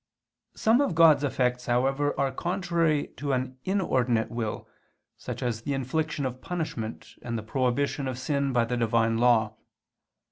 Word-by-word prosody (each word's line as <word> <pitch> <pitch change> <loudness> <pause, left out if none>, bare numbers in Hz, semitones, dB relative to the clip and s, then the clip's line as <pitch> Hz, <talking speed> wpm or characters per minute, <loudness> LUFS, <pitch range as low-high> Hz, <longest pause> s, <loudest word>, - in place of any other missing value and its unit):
Some 225 +5 +3
of 275 - 0
God's 160 -3 +6
effects, 125 -2 0
however, 135 +4 +1
are 135 -1 +1
contrary 170 -1 0
to 140 -1 -2
an 130 0 -2
inordinate 125 - +1
will, 115 -2 -4 0.5
such - - -6
as 115 -2 -2
the 140 +4 -2
infliction 145 +2 -2
of 130 0 -4
punishment, 155 -11 -5
and 120 -1 -3
the 110 - -5
prohibition 135 +4 0
of 130 -2 -3
sin 140 +1 -1
by 120 -2 +2
the 125 +1 -2
Divine 115 -1 +2
Law. 110 -3 +3
130 Hz, 150 wpm, -27 LUFS, 120-150 Hz, 0.5 s, God's